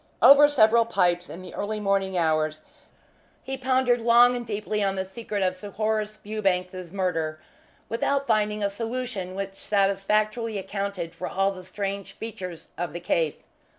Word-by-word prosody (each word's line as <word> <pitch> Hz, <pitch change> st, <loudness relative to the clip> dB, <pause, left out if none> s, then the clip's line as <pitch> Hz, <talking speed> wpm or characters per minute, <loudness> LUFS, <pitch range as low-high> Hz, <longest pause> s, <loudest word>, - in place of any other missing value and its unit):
Over 285 Hz, +1 st, +9 dB
several 230 Hz, -4 st, +5 dB
pipes 175 Hz, -5 st, +1 dB
in 185 Hz, -, -8 dB
the -, -, -10 dB
early 215 Hz, +1 st, -3 dB
morning 195 Hz, -2 st, 0 dB
hours 155 Hz, -2 st, +1 dB, 0.8 s
he 270 Hz, -, -4 dB
pondered 255 Hz, -2 st, +2 dB
long 240 Hz, +1 st, +6 dB
and 245 Hz, -, -3 dB
deeply 210 Hz, -1 st, -2 dB
on 195 Hz, -1 st, 0 dB
the 190 Hz, 0 st, -2 dB
secret 205 Hz, 0 st, -4 dB
of 185 Hz, 0 st, +1 dB
Sir 185 Hz, +3 st, -9 dB
Horace 215 Hz, 0 st, -1 dB
Fewbanks's 185 Hz, -4 st, -2 dB
murder, 165 Hz, -5 st, -1 dB, 0.5 s
without 275 Hz, +4 st, 0 dB
finding 210 Hz, -2 st, +1 dB
a 200 Hz, -, +2 dB
solution 225 Hz, -4 st, -4 dB
which 195 Hz, 0 st, -4 dB
satisfactorily 210 Hz, +3 st, 0 dB
accounted 195 Hz, -3 st, -4 dB
for 165 Hz, -, -5 dB
all 195 Hz, +1 st, +1 dB
the 185 Hz, -1 st, -8 dB
strange 195 Hz, +1 st, -4 dB
features 185 Hz, -7 st, -7 dB
of 175 Hz, -3 st, -3 dB
the 175 Hz, -, -4 dB
case. 165 Hz, -3 st, -1 dB
200 Hz, 155 wpm, -26 LUFS, 185-220 Hz, 0.8 s, Over